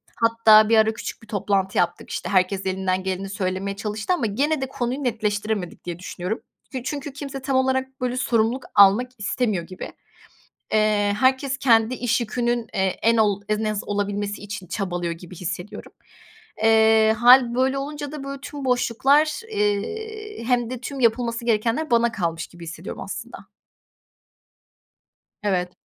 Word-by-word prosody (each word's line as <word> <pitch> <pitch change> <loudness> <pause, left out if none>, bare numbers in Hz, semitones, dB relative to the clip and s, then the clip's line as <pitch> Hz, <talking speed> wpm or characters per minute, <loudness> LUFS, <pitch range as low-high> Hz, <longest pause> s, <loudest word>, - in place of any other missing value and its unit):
Hatta 225 -2 +5
bir 225 - +5
ara 220 0 +4
küçük - - -7
bir - - -15
toplantı 200 -2 -1
yaptık. 175 0 0
İşte, - - -4
herkes 190 0 +1
elinden 185 0 -1
geleni 190 +1 -3
söylemeye 195 0 -2
çalıştı 210 - -2
ama 270 -10 0
gene 275 +8 0
de 265 - -2
konuyu 255 +2 -3
netleştiremedik 210 -5 -2
diye 175 -1 -5
düşünüyorum. 185 +3 -4 0.4
Çünkü 285 0 -5
kimse 275 -1 -6
tam 265 0 -1
olarak, 260 0 0
böyle, 250 0 -1
sorumluluk 235 +1 +1
almak 205 +6 +6
istemiyor 210 -4 -1
gibi. 185 - -8 0.8
Eee, 210 -1 +2
herkes 265 +1 +2
kendi 230 -1 +4
iş 245 -1 0
yükünün, 240 +1 -1
eee, - - 0 0.2
en 230 +1 +4
ol 205 -3 +2
en 215 +1 0
az 215 -1 -2
olabilmesi 205 0 -2
için 205 -2 -7
çabalıyor 175 -2 -3
gibi 175 +2 -11
hissediyorum. 180 +3 -6 0.7
Eee, 220 0 +5
hâl 245 0 +7
böyle 260 +2 +1
olunca 290 +1 -5
da, 295 -3 -6
böyle, 275 0 -6
tüm 285 -1 -7
boşluklar, 270 +5 +2
eee, 425 - -3
hem 240 -1 +1
de 255 - -5
tüm 270 +1 -6
yapılması 235 0 +1
gerekenler 235 +6 0
bana 235 0 +3
kalmış 170 -5 -2
gibi 175 -1 -13
hissediyorum, 165 - -7
aslında. - - -8 2.0
Evet. 180 -3 0
225 Hz, 150 wpm, -23 LUFS, 200-255 Hz, 2.0 s, hâl